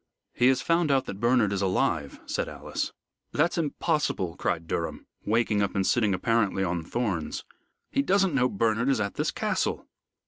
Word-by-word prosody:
"He 125 - +3
has 130 0 +3
found 165 -1 +2
out 135 -2 +3
that 100 - -6
Bernard 115 -3 +3
is 100 - -1
alive," 85 -6 0
said - - -2
Alice. - - -4 0.4
"That's 170 +3 +2
impossible!" 150 - -1
cried 85 -1 -1
Durham, 85 0 -3 0.2
waking 110 -1 +2
up 100 - -1
and 95 -1 +1
sitting 105 -4 +2
apparently 105 -1 +1
on 85 -2 -1
thorns. 95 -4 -2 0.5
"He - - +2
doesn't 190 +3 +2
know 125 -2 +3
Bernard 115 +4 +1
is 135 -4 +2
at 100 -1 -1
this - - -1
Castle." - - -1
115 Hz, 170 wpm, -27 LUFS, 95-135 Hz, 0.5 s, He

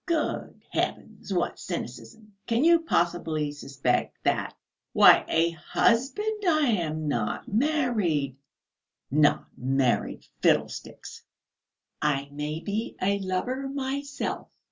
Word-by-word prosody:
"Good 330 -3 -2
heavens, - - -3
what - - -1
cynicism!... 220 -2 -7
Can 235 +3 +2
you 335 +1 +6
possibly 170 - 0
suspect 135 -3 -1
that? - - 0 0.4
Why - - +8
a 165 +1 +3
husband?... 270 - 0
I 310 -6 +3
am 155 -7 -1
not 115 -7 -2
married." 215 - +1 0.8
"Not 145 +1 +3
married? 130 -1 0 0.2
Fiddlesticks!" - - -1 0.8
"I 140 -2 0
may 150 +2 -4
be 215 +4 -3
a 200 +1 +1
lover 245 +9 -2
myself!" 280 +1 -3
190 Hz, 100 wpm, -27 LUFS, -, 0.8 s, Why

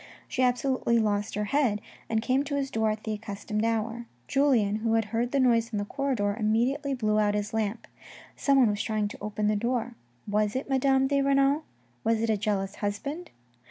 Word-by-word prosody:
She 260 - -2
absolutely 250 -1 +2
lost 210 -1 0
her 210 - -1
head, 255 -8 +2 0.3
and 220 0 0
came 260 +3 +2
to 285 0 -3
his 275 -1 -2
door 220 0 +1
at 215 0 -3
the 220 - -2
accustomed 210 0 -4
hour. 230 +1 -1 0.2
Julien, 245 -8 +2
who 225 +1 0
had 225 -1 +2
heard 240 +2 0
the 280 - +1
noise 230 -3 +3
in 215 - -2
the 205 - -1
corridor, 240 -6 -1
immediately 255 +6 +1
blew 215 -3 +1
out 205 -1 +2
his 210 +1 -2
lamp. 220 0 -2 0.5
Someone 270 -6 +4
was 205 0 -2
trying 215 -2 -1
to - - -9
open 210 0 -2
the 210 0 +2
door. 240 +2 -1 0.3
Was 210 +1 0
it 260 - -2
Madame 270 0 +3
de 280 +1 +2
Renal? 275 +2 +2 0.4
Was 225 0 +2
it 225 0 +1
a - - +3
jealous 195 -2 -2
husband 280 +12 -4
225 Hz, 195 wpm, -27 LUFS, 210-265 Hz, 0.5 s, Someone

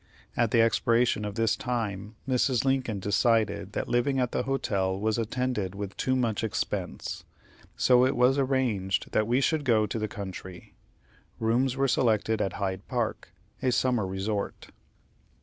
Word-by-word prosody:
At 120 -2 +2
the 115 +1 +4
expiration 115 -1 +2
of 105 - -5
this 115 -1 +2
time 110 -4 -3
Mrs. 130 -1 +1
Lincoln 130 -6 0
decided 110 +3 +1
that - - -2
living 125 +3 +1
at 125 -2 0
the - - 0
hotel 95 -8 -1
was 110 +2 0
attended 115 -4 -2
with 100 -1 -5
too 130 - 0
much 115 -4 0
expense, 110 - -3 0.5
so 125 -1 +5
it 130 +1 +2
was 125 +3 +4
arranged 125 -8 0
that 110 - +1
we 125 +3 +2
should 155 +2 +1
go 110 -5 +3
to 105 +2 -3
the 110 - -1
country. 95 -3 -8 0.7
Rooms 120 +4 +1
were 135 0 +2
selected 110 -4 +1
at 95 - -1
Hyde 95 -1 -3
Park, 120 -7 -2 0.3
a 130 -1 +2
summer 120 -5 +1
resort. 100 +2 -3
115 Hz, 155 wpm, -28 LUFS, 105-125 Hz, 0.7 s, so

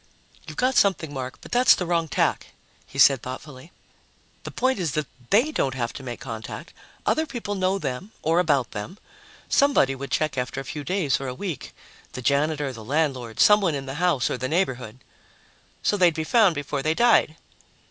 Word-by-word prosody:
"You've - - -9
got 255 +1 +2
something, 175 -7 +2
Mark, 130 -1 -5
but - - -13
that's 245 +1 +6
the 180 - -3
wrong 170 -1 0
tack," - - -1 0.3
he - - -12
said 135 -2 +6
thoughtfully. 130 +4 -9 0.7
"The - - -4
point 260 -3 0
is 165 -6 -1
that 155 -1 -1 0.2
they 240 +10 +3
don't 135 - -1
have 120 -2 -2
to - - -8
make 120 -2 -6
contact; 110 -3 -7 0.3
other 315 0 +1
people 235 -7 -4
know 190 0 0
them 150 +5 -5
or 165 +2 +3
about 145 -8 +1
them. 105 - -6 0.5
Somebody 280 - +3
would 140 +1 -7
check 155 -4 0
after 125 +2 -3
a - - -5
few 150 +3 -6
days 160 -6 0
or 135 - -4
a 125 - -4
week 175 -2 -6 0.4
the 130 - -6
janitor, 145 0 +1
the 115 -2 -10
landlord, 130 -3 -1
someone 200 -6 +5
in 135 -1 -5
the 135 - -5
house 170 -8 +2
or 125 - -3
the 130 +1 -2
neighborhood." 130 - -2 0.8
"So 205 - +2
they'd 175 -4 +4
be 160 - -2
found 200 -1 +4
before 145 -1 -3
they 155 +3 0
died." 235 -9 +4
150 Hz, 190 wpm, -24 LUFS, 130-185 Hz, 0.8 s, that's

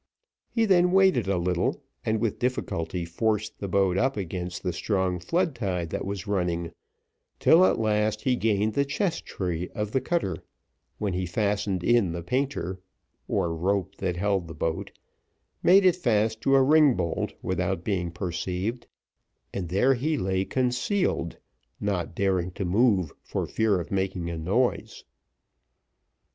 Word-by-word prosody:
He 225 -1 +1
then 180 -3 +4
waited 190 - +4
a 95 -1 +1
little, 90 0 0 0.2
and 110 0 0
with 115 -2 -1
difficulty 90 -8 -2
forced 105 +5 -1
the 100 - -3
boat 95 0 +2
up 135 -2 +1
against 90 -2 -4
the 90 -2 -1
strong 95 -1 0
flood 170 - 0
tide 90 -8 -3
that - - -3
was 100 0 -4
running, 90 -4 -1 0.7
till 170 +3 +6
at - - +2
last 110 -1 +1
he 130 -2 +2
gained 110 -2 +1
the 140 - +2
chesstree 105 - -2
of 105 -2 -2
the 130 - +1
cutter, 130 - -1 0.6
when 100 -3 -2
he 90 0 -2
shortened 100 -1 -1
in 115 -7 +3
the 85 0 -5
painter 110 -5 -2 0.5
(or 85 -1 0
rope 95 +2 0
that 90 -2 -2
held 95 -2 0
the 80 - -8
boat), 80 +1 -2 0.7
made 190 +2 +6
it 180 -1 +5
fast 110 - +1
to 135 - +3
a 135 - +6
ringbolt 140 - +3
without 90 0 -1
being 90 -4 -1
perceived, 90 +6 -3 0.7
and 90 -4 -4
there 100 +9 +3
he 150 +5 0
lay 95 -2 0
concealed, 130 - 0 0.4
not 90 -5 -2
daring 95 -2 +1
to 95 - -3
move, 95 - +2
for - - -3
fear 110 -4 +1
of 85 - -7
making 95 -3 -1
a 85 - -4
noise. 105 +10 0
100 Hz, 150 wpm, -26 LUFS, 90-120 Hz, 0.7 s, till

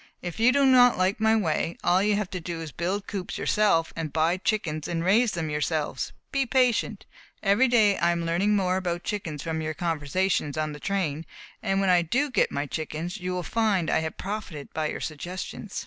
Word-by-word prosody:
If 175 +3 -5
you 235 +3 +5
do 280 +1 +3
not 250 -2 +6
like 185 +3 +1
my 220 0 +4
way, 165 -4 0
all 180 +2 +3
you 210 +1 +2
have 205 -3 -2
to 185 - -3
do 170 0 -5
is 160 -2 -6
to - - -31
build 190 +4 -2
coops 190 -3 -5
yourselves 200 -6 +2
and 160 -2 -4
buy 165 +4 +2
chickens 170 -7 -2
and 165 -1 -2
raise 215 +6 +3
them 160 -3 -3
yourselves. 150 -2 -2 0.2
Be 275 -1 0
patient. 240 -5 +1 0.4
Every 210 +6 +4
day 220 -5 +4
I 170 +2 +3
am 170 -1 0
learning 190 +5 +2
more 185 -2 +1
about 175 -2 -2
chickens 170 -9 -4
from 160 -1 -2
your 155 0 -3
conversations 165 -1 -1
on 155 0 -1
the 150 - -8
train, 165 -6 -2 0.3
and 195 0 0
when 195 -1 +2
I 175 -1 +5
do 260 - 0
get - - +2
my 140 +1 -2
chickens 160 +5 -4
you 185 -2 -4
will 180 -1 -2
find 205 -5 +1
I - - +3
have 160 0 -4
profited 195 -8 -6
by 155 -1 -1
your - - -5
suggestions." 180 +6 -5
180 Hz, 210 wpm, -26 LUFS, 160-210 Hz, 0.4 s, not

